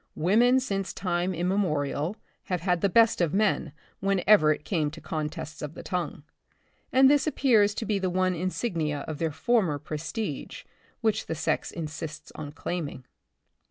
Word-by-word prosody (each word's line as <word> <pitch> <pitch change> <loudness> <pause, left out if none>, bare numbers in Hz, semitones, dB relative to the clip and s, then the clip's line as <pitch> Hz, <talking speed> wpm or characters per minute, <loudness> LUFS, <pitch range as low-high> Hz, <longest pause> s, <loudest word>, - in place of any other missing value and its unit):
Women 235 +10 +4
since 195 -7 -2
time 180 0 -1
immemorial, 170 -1 0 0.3
have 180 -3 -2
had 180 -1 +1
the 200 - +3
best 225 +1 +4
of 170 0 +1
man 205 -7 +1 0.3
whenever 195 -4 +4
it 150 - -3
came 160 -6 0
to 155 +2 -10
con 155 -2 -3
tests 155 -1 -8
of 150 +2 -6
the - - -8
tongue, 180 -5 -3 0.7
and 265 +1 +6
this 285 0 +4
appears 220 -9 +3
to 225 - -3
be 210 -3 0
the 190 -1 0
one 185 +1 +1
insignia 170 -4 -2
of* 150 +1 -6
their 165 - +1
former 190 -4 +1
prestige 155 +9 -5 0.4
which 220 -3 0
the 160 - -2
sex 155 - -1
insists 155 -1 -6
on 145 -1 -7
claiming. 155 -5 -5
180 Hz, 160 wpm, -27 LUFS, 155-205 Hz, 0.7 s, and